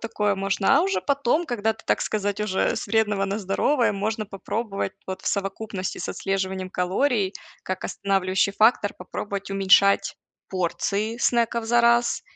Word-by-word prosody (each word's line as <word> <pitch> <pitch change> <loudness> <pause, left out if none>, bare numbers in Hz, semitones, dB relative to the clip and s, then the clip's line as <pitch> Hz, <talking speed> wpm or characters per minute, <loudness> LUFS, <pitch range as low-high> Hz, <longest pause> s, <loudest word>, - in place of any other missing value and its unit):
такое 210 -3 0
можно, 195 0 +2
а - - +5
уже 195 -1 0
потом, 280 - +1
когда 220 -3 0
ты, 220 - -18
так - - +2
сказать, 205 -1 -2
уже 200 -3 0
с - - -4
вредного 210 -3 +1
на 200 +2 -2
здоровое, 220 +7 +1
можно 215 +1 -2
попробовать 200 0 -4
вот 190 0 -6
в - - -10
совокупности 195 -1 -3
с - - -4
отслеживанием 190 -1 -2
калорий, 190 +3 0 0.3
как 185 0 -4
останавливающий 195 0 0
фактор, 215 -1 +3
попробовать 200 +2 -6
уменьшать 195 0 +4 0.3
порции 200 +4 -1
снеков 235 -1 +1
за 240 +1 +3
раз. 235 0 +3
200 Hz, 150 wpm, -24 LUFS, 195-225 Hz, 0.3 s, а